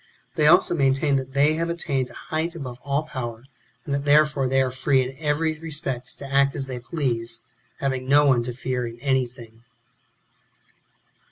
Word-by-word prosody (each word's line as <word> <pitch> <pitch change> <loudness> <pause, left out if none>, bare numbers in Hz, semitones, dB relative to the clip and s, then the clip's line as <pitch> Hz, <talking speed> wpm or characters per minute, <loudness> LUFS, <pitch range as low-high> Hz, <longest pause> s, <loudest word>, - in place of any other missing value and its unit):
They 150 - +3
also 165 - +5
maintain 140 -1 +2
that 130 0 -5
they 145 +2 +4
have 165 +1 -1
attained 140 -6 -1
to - - -15
a - - -15
height 160 +2 -3
above 130 -6 -7
all 140 +1 0
power, 120 -6 -6 0.4
and 140 - -3
that 140 0 -1
therefore 145 -1 +4
they 135 +1 +2
are 130 - -2
free 130 +1 +2
in 130 +1 -6
every 155 +1 0
respect 150 -6 -4
to - - -8
act 140 0 +3
as 135 - -2
they 130 -2 -5
please, 120 -4 -2 0.4
having 130 -2 -2
no 145 +1 +6
one 130 -4 +4
to 125 - -4
fear 125 -1 -2
in 115 0 -9
anything. 120 -4 -2
135 Hz, 180 wpm, -24 LUFS, 125-150 Hz, 0.4 s, no